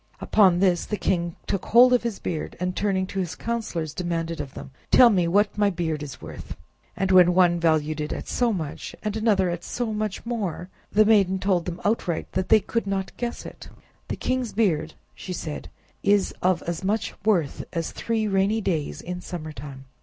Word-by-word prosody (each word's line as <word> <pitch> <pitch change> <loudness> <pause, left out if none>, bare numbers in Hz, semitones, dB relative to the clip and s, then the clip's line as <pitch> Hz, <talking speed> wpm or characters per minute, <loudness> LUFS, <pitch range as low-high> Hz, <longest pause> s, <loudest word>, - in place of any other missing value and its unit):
Upon 190 -4 +4
this 180 -3 +2
the 210 - -3
king 170 -4 -1
took 195 - -2
hold 250 +2 +6
of 245 - +4
his 235 -3 -3
beard, 160 -3 -4
and 180 +1 -2
turning 195 -2 0
to 195 +1 -5
his 175 -4 -3
councilors, 210 -10 -3
demanded 165 -2 -2
of 140 -2 -9
them: 135 - -9 0.2
"Tell 245 -2 +7
me 180 -4 +2
what 205 +4 +2
my 205 -1 +4
beard 165 -5 -2
is 140 -3 -7
worth?" - - -9 0.4
And 190 0 0
when 180 -1 +6
one 175 -2 +4
valued 155 -2 +1
it 150 - -3
at - - -5
so 245 -2 +1
much, 160 -8 -5
and 210 -1 -2
another 205 -5 +2
at 175 0 -5
so 235 +2 -3
much 215 -1 -3
more, 200 -7 -3 0.2
the 215 +1 +5
maiden 200 -3 +4
told 185 -3 +1
them 175 0 -5
outright 200 -6 -1
that 185 0 -2
they 220 - +7
could 230 +2 -2
not 195 -1 -2
guess 240 -1 -4
it. - - -10 0.4
"The - - -3
king's 255 -3 -2
beard," 160 -8 +1 0.2
she 185 - -7
said, 155 -3 -6 0.3
"is 200 -1 +2
of 180 -1 +2
as 170 +2 -4
much 210 +3 -1
worth 180 -9 +1
as 165 -1 -3
three 225 -2 -1
rainy 195 +2 +2
days 165 -8 -2
in 180 0 -6
summer 155 -4 -6
time." 135 -1 -9
185 Hz, 200 wpm, -25 LUFS, 170-210 Hz, 0.4 s, Tell